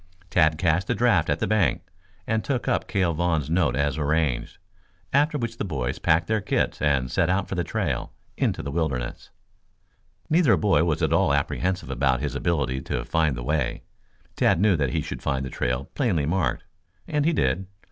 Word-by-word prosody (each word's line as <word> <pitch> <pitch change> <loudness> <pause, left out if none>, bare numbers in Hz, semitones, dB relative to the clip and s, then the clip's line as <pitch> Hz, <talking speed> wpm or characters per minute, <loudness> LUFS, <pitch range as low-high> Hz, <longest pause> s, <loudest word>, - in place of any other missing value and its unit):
Tad 80 -2 +3
cashed 85 +2 +1
the 120 - 0
draft 100 -8 +2
at 75 - +2
the - - -1
bank 100 - +1 0.4
and 110 0 0
took 130 -4 -2
up - - 0
Cale 95 -5 +1
Vaughn's 80 -3 0
note 80 -7 +2
as 70 +2 0
arranged, 75 -5 0 0.6
after 150 +2 +3
which 115 -3 -4
the - - -1
boys 70 -10 -3
packed 80 +1 +2
their 110 +1 0
kits - - -1
and 70 -4 +1
set - - +1
out 95 +1 +1
for - - -5
the 90 -2 -1
trail 85 - -2 0.2
into - - -1
the 70 - -4
wilderness. 70 -6 -3 1.0
Neither 160 -6 +4
boy 100 -5 +3
was 80 0 0
at 80 0 +2
all 85 -3 +3
apprehensive 90 +3 -1
about 65 -1 +1
his - - -3
ability 70 -6 -1
to - - -3
find 80 -5 +1
the - - -5
way. 70 -2 -1 0.5
Tad - - +3
knew 100 -1 +4
that 70 -4 0
he - - -1
should - - -6
find 65 -1 -1
the 65 - -6
trail 60 +2 -2
plainly 95 - +1
marked, 85 +3 0 0.4
and 150 -1 0
he 165 - +3
did. 90 - 0
80 Hz, 190 wpm, -25 LUFS, 70-95 Hz, 1.0 s, Neither